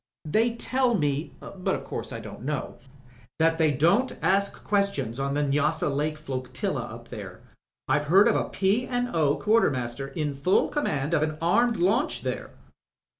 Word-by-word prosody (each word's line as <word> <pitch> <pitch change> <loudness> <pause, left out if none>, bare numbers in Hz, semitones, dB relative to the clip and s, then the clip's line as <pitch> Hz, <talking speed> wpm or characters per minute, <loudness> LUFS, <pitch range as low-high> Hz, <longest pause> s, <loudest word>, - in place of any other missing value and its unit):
They 225 +9 +1
tell 255 0 +1
me, 145 -3 -1
but 185 -2 -3
o' - - -3
course 135 - -5
I 115 - -5
don't 110 -1 -9
know, 145 +2 -4 0.6
that 165 +1 +2
they 160 -1 +4
don't 170 - +2
ask 200 +1 +1
questions 170 - 0
on 140 +1 -1
the 150 - +1
Nyassa 150 +2 +1
Lake 150 +2 -1
Flotilla 130 -4 -3
up - - -9
there. - - -8 0.5
I've 150 +2 +1
heard 190 +8 +6
of 230 - +3
a - - 0
P. 200 +6 +1
and 245 -3 -2
O. 150 -3 +3
quartermaster 135 - +1
in 145 +1 -3
full 140 +8 +2
conmiand 150 - -1
of 155 - +3
an 155 0 -1
armed 225 +8 +2
launch 220 - +1
there." - - -3
155 Hz, 170 wpm, -26 LUFS, 140-200 Hz, 0.6 s, heard